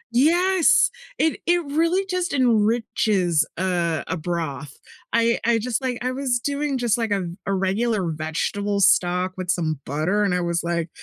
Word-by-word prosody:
Yes, 345 +6 +4 0.3
it 320 - +1
it 350 0 +3
really 335 +6 +1
just 365 -3 -2
enriches, 215 - +2
uh, 175 -3 -1
a - - -2
broth. 160 -4 -4 0.4
I 230 0 +2
I 235 0 +3
just 230 +1 -2
like 255 -2 -2
I 255 - 0
was 255 -2 0
doing 285 +2 -2
just 240 -2 +1
like 225 -1 -1
a 200 -1 +1
v 170 -1 -6
a 200 - +1
regular 195 +1 0
vegetable 170 +6 -2
stock 185 -1 +2
with 185 -1 -5
some 160 -5 0
butter, 160 +9 0
and 195 -3 +1
I 180 - 0
was 170 -1 -1
like, 170 -1 -2
205 Hz, 170 wpm, -23 LUFS, 175-255 Hz, 0.4 s, Yes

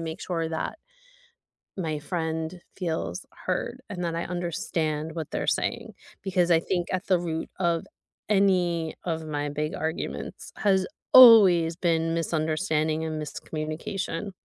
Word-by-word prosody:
make 160 -1 -5
sure 165 -3 -2
that 160 - -3 1.0
my 160 -5 -2
friend 160 +1 -3
feels 175 +1 -3 0.2
heard 235 +7 -2
and 180 -3 -4
that 170 -1 -1
I 170 - -2
understand 160 -3 -2
what 160 -3 -5
they're - - -2
saying. - - -1 0.3
Because 180 -2 +1
I 165 - +6
think 175 +1 -2
at 185 +1 -2
the 185 -2 +3
root 165 -2 -3
of 170 -3 +1 0.4
any 180 -5 +2
of 160 -2 -2
my 145 -1 -2
big 150 +2 -3
arguments 160 +1 -4
has 190 -2 +2 0.3
always 195 -10 +9
been 165 -2 +1
misunderstanding 160 -1 0
and 155 -1 -3
miscommunication. 155 +6 -4
165 Hz, 135 wpm, -26 LUFS, 160-180 Hz, 1.0 s, always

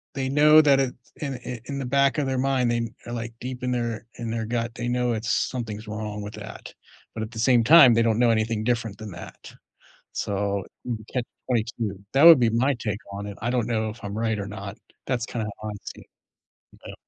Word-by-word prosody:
they 135 -1 -1
know 150 +3 +6
that 140 -3 +4
it 130 -2 0 0.3
in 140 -3 -3
i 125 0 -6
in 140 +1 -5
the 135 - -3
back 140 +2 +2
of 145 - +1
their 130 -1 -1
mind 130 -2 +1
they 115 -1 -1 0.2
are 120 - -6
like 115 -1 -5
deep 125 0 -5
in 125 - 0
their 120 -2 -2
in 115 -1 -5
their 115 -1 -2
gut, 115 0 -2
they 120 - -3
know 125 0 +1
it's 110 +1 -3
something's 110 -4 -2
wrong 105 -1 -5
with 105 +1 -7
that, - - -9 0.4
but 110 - -5
at 110 - -7
the 115 - -7
same 120 0 +4
time, 140 -2 +8
they 115 - +3
don't 115 -1 +2
know 120 -1 +5
anything 110 -1 0
different 115 -3 -1
than 110 -1 -8
that. 85 - -11 0.6
So 100 -1 -1 0.3
uh - - 0 0.2
catch 125 -2 -1 0.2
22, 110 -4 -1
that 135 - +4
would 165 -4 +10
be 120 -2 +3
my 130 +5 +2
take 105 -3 -3
on 100 +1 -5
it. 100 - -8
I 120 - -1
don't 120 -3 0
know 110 -2 0
if 110 +3 -10
I'm 100 +1 -5
right 110 -1 0
or 100 - -4
not 100 0 -7 0.3
that's 125 -3 -1
kinda 115 -3 -3 0.2
how 110 - -4
I - - -4
see - - -8
it, - - -24 0.6
though. - - -7
115 Hz, 230 wpm, -25 LUFS, 110-125 Hz, 0.6 s, would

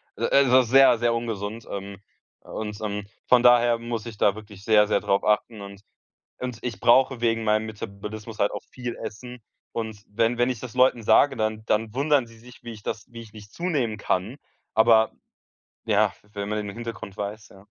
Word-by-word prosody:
Also 130 -2 +4
sehr, 130 +1 +5
sehr 120 0 +2
ungesund, 115 -1 -4
ähm, 100 0 -6 0.4
und, 105 -1 -6
ähm, 105 -1 -3 0.2
von 125 -1 +5
daher 120 -1 +5
muss 115 -2 -5
ich 115 -3 -8
da 100 - +3
wirklich 105 -2 -12
sehr, 105 -1 +4
sehr - - +2
drauf 100 0 +1
achten 105 +1 0
und 100 0 -10 0.6
und 125 -2 -5
ich 120 -3 -5
brauche 125 +1 +4
wegen 115 -1 +1
meinem 110 0 +1
Metabolismus 105 +1 -8
halt 100 - +3
auch - - -6
viel 125 -2 -6
Essen 125 +3 -8 0.3
und 110 -2 -5
wenn 115 +3 0
wenn 120 +1 +2
ich 125 -4 -4
das 125 -2 -8
Leuten 125 -2 +3
sage, 130 +6 +4
dann 110 0 -2
dann 110 0 0
wundern 140 -1 +2
sie 115 -1 -17
sich, 125 +1 -16
wie 120 - -7
ich 105 -2 -12
das 110 - -5
wie 115 -1 -9
ich 110 -2 -15
nicht 105 -1 -13
zunehmen 145 -11 -1
kann, 105 +3 -2 0.4
aber, 110 0 +5 0.7
ja - - +2 0.2
wenn 100 -1 -5
man 105 0 -2
den 100 -1 -7
Hintergrund 115 -4 -7
weiß, 105 +1 -6
ja. 95 +1 -18
110 Hz, 190 wpm, -25 LUFS, 105-120 Hz, 0.7 s, sehr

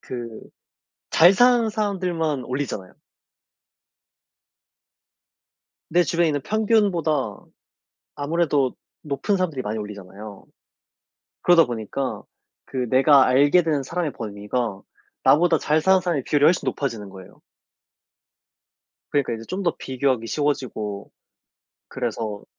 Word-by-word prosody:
그 120 -2 -6 0.8
잘 175 +4 +7
사는 240 +1 +4
사람들만 180 - -2
올리잖아요. 125 -8 -4 3.0
내 175 +2 +4
주변에 170 -1 +1
있는 145 -2 -1
평균보다 185 - +1 0.8
아무래도 145 -3 0 0.3
높은 150 +8 -1
사람들이 165 -8 -2
많이 110 -1 -4
올리잖아요. 100 0 -9 1.0
그러다 175 -2 +6
보니까 120 +3 -4 0.4
그 125 -2 -4
내가 135 +2 +5
알게 145 +7 +4
된 150 -4 0
사람의 165 +1 -3
범위가 105 0 -4 0.4
나보다 165 +1 +4
잘 155 +1 +1
사는 190 +3 +4
사람의 170 -7 -2
비율이 145 -1 +2
훨씬 170 - +4
높아지는 115 -8 -3
거예요. 95 -1 -14 1.7
그러니까 140 -4 0
이제 115 0 -8
좀 190 +2 -3
더 170 - 0
비교하기 130 -3 -1
쉬워지고 115 -8 -3 0.8
그래서 115 -4 -4
140 Hz, 260 characters per minute, -23 LUFS, 115-170 Hz, 3.0 s, 잘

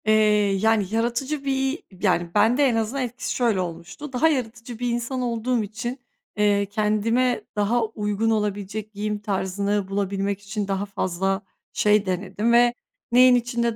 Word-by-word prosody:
Eee, 215 - +4 0.5
yani 220 -2 +3
yaratıcı 240 +6 -1
bir 270 +2 -1 0.2
yani 175 -3 +2
ben 235 +3 +4
de 290 - +4
en 255 -4 +3
azından 225 +4 -1
etkisi 245 0 -4
şöyle 230 -6 +2
olmuştu; 175 - -7
daha 255 +6 +3
yaratıcı 240 -5 -3
bir 245 -1 -1
insan 240 +2 -2
olduğum 240 -1 0
için, 240 +5 -5 0.4
eee, 205 -1 +3
kendime 220 +4 +1
daha 220 +3 +1
uygun 215 0 -1
olabilecek 210 0 -2
giyim 210 +1 -3
tarzını 200 0 -1
bulabilmek 200 0 -2
için 205 0 -4
daha 195 0 -1
fazla 195 0 -1 0.3
şey 210 -1 +3
denedim 190 +4 -1
ve 240 0 +5 0.4
neyin 250 +1 +7
içinde 235 -1 0
220 Hz, 150 wpm, -24 LUFS, 200-240 Hz, 0.5 s, neyin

